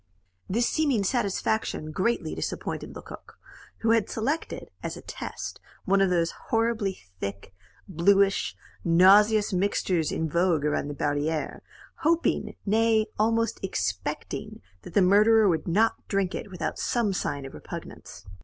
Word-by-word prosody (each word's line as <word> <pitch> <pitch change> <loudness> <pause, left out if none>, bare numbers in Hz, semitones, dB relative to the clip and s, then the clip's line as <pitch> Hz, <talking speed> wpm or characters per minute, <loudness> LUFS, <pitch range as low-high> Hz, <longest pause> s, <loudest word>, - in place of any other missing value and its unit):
This 235 +5 +2
seeming 280 -9 +1
satisfaction 200 -6 -1
greatly 215 +9 0
disappointed - - -4
Lecoq, - - -11 0.4
who 225 - +3
had 225 -2 +2
selected, 275 +9 -3
as - - -5
a - - -11
test, - - -7 0.2
one 195 +1 +3
of 195 - +4
those 170 -2 +1 0.2
horribly 225 -4 0 0.2
thick, 100 0 -6 0.3
bluish, 195 +2 +2 0.3
nauseous 200 +5 +5
mixtures 180 -4 +1
in 160 - -1
vogue 170 -1 +1
around 150 -1 0
the 145 - -5
barrieres 150 +2 -1 0.4
hoping, 330 +1 +1
nay, 220 +1 +3
almost 230 +1 +1
expecting, 95 - -4 0.2
that - - -12
the 200 - +6
murderer 210 +3 +5
would 170 -2 0
not 215 +7 +1
drink 195 -2 0
it - - -5
without 175 -4 -4
some 230 -5 0
sign 140 -6 -3
of 135 - -9
repugnance. 85 - -9
195 Hz, 135 wpm, -27 LUFS, 165-225 Hz, 0.4 s, the